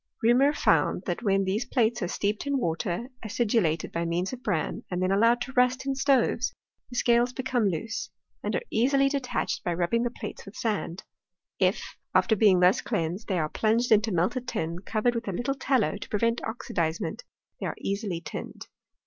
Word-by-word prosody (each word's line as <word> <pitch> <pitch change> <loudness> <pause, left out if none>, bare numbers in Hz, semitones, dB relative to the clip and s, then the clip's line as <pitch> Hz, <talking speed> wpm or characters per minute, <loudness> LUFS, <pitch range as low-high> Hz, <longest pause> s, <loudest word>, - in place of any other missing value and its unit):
Reaumur 250 +5 +5
found, - - +2
that - - -2
when 195 -3 +2
these 195 +5 0
plates 235 -3 +1
are 180 - 0
steeped 205 +7 -2
in 280 -1 +1
water 180 +4 -2
acidulated 210 -7 0
by 170 - -2
means 175 +5 -1
of 255 - -7
bran, 190 -10 -1
and 180 - -2
then 185 +1 +1
allowed 230 +4 +4
to 265 - -4
rust 250 +1 +2
in 275 - 0
stoves, 270 -1 +2 0.3
the 245 - -9
scales 240 0 +3
become 250 -5 0
loose, 220 +6 -4 0.3
and - - -2
are - - -1
easily 275 +4 +3
detached 275 -3 -2
by 175 -1 -1
rubbinj^ 180 +7 +1
the - - +1
plates 240 - -8
with 195 - -12
sand. 200 -6 -2 0.6
If 185 0 +2 0.3
after 185 +4 +4
being 195 -4 +5
thus 180 +2 +5
cleansed 185 -1 -2
they 190 - 0
are 155 -2 +1
plunj^ed 225 +8 +1
into 220 +1 +4
melted 225 +9 0
tin, 170 -5 -2
covered 220 +5 0
with 230 -1 -4
a - - 0
little 240 +8 -1
tallow 255 - +1
to - - -9
prevent 230 +3 +1
oxidizement, 170 - -2 0.4
they - - -2
are - - -4
easily 200 -4 -3
tinned. 150 - -7
220 Hz, 185 wpm, -27 LUFS, 185-245 Hz, 0.6 s, Reaumur